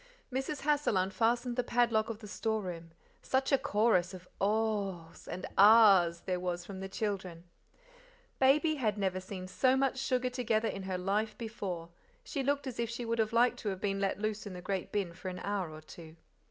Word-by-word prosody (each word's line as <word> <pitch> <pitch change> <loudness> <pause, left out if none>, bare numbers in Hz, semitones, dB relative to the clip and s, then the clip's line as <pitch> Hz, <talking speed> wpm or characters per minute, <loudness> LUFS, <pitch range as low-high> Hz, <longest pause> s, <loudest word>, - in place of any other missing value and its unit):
Mrs. 270 +3 -2
Hassal 290 -7 +2
unfastened 235 +6 +1
the 250 - +2
padlock 235 -3 +2
of 225 - -4
the 215 -1 -11
store 220 +1 -1
room. 170 -2 -6 0.3
Such 265 +2 0
a 275 - +6
chorus 200 -4 +2
of 180 0 -12
"ohs!" 200 -5 -1
and 185 - -5
"ahs!" 195 -5 +7
there 180 -1 -2
was 180 -1 -3
from 195 0 -8
the 195 0 -5
children! 190 -5 -3 1.0
Baby 300 +4 +4
had 215 -6 0
never 190 -2 0
seen 185 0 -7
so 255 +9 +2
much 265 -1 +1
sugar 255 -1 0
together 230 -3 0
in 195 - -4
her 185 - -1
life 205 +4 -1
before; 195 -7 -5 0.3
she 280 - -3
looked 285 +1 0
as 255 -3 -6
if 235 -1 -1
she 235 +1 -4
would 230 0 -1
have 220 -1 +1
liked 240 +2 +3
to 210 - -2
have 190 -2 -4
been 195 0 -1
let 195 -1 0
loose 215 0 -3
in 195 - -7
the 180 - -7
great 190 -1 -3
bin 195 -5 -1
for 185 +2 -6
an 180 - -6
hour 200 -4 -2
or 155 0 -10
two. 160 0 -12
210 Hz, 200 wpm, -32 LUFS, 185-235 Hz, 1.0 s, ahs